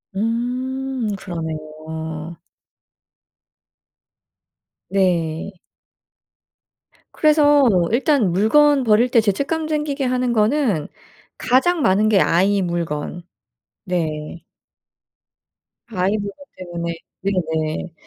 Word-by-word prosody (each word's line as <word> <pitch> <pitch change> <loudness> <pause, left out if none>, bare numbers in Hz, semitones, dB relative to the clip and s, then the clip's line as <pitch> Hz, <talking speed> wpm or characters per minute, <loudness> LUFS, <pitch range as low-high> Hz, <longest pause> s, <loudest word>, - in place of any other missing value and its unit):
음 250 +3 -2
그러네요. 160 -1 -6 2.5
네. 175 -2 0 1.6
그래서 295 -3 +4 0.2
일단 245 - +2
물건 275 +9 +4
버릴 230 +2 +3
때 235 -2 +4
죄책감 280 +10 -1
생기게 300 -3 -2
하는 250 -1 0
거는 215 - +1 0.5
가장 315 +7 +2
많은 210 -2 +3
게 205 -3 +4
아이 195 +4 +2
물건. 170 -1 -3 0.6
네. 165 -3 -3 1.4
아이 195 -1 0
물건 205 +7 -7
때문에 170 -2 -5 0.3
네네. 160 -4 -2
200 Hz, 150 characters per minute, -20 LUFS, 170-255 Hz, 2.5 s, 그래서